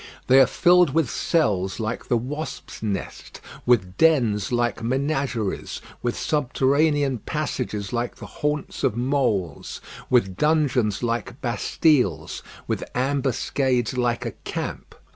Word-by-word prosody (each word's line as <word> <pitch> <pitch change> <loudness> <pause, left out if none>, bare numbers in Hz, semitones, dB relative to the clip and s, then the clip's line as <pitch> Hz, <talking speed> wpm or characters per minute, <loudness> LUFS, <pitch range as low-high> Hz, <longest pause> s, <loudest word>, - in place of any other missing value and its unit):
They 130 +1 +6
are 130 - +7
filled 175 -1 +4
with 160 -6 +2
cells 100 - 0
like 110 +1 -3
the 120 - +2
wasps' 150 +7 -6
nest, 100 -4 -5 0.3
with 100 -7 +2
dens 120 -12 +3
like 120 -1 0
menageries, 130 -3 -1 0.2
with 120 -1 -1
subterranean 140 -1 +1
passages 125 -7 -3
like 120 0 -2
the - - -10
haunts 150 -1 -3
of 105 - +1
moles, 120 - -1 0.3
with 95 -8 +2
dungeons 130 -9 +2
like 120 +2 -2
Bastiles, 125 - +1 0.2
with - - -2
ambuscades 130 -1 0
like 120 -1 0
a - - -2
camp. - - -6
125 Hz, 120 wpm, -24 LUFS, 115-145 Hz, 0.3 s, are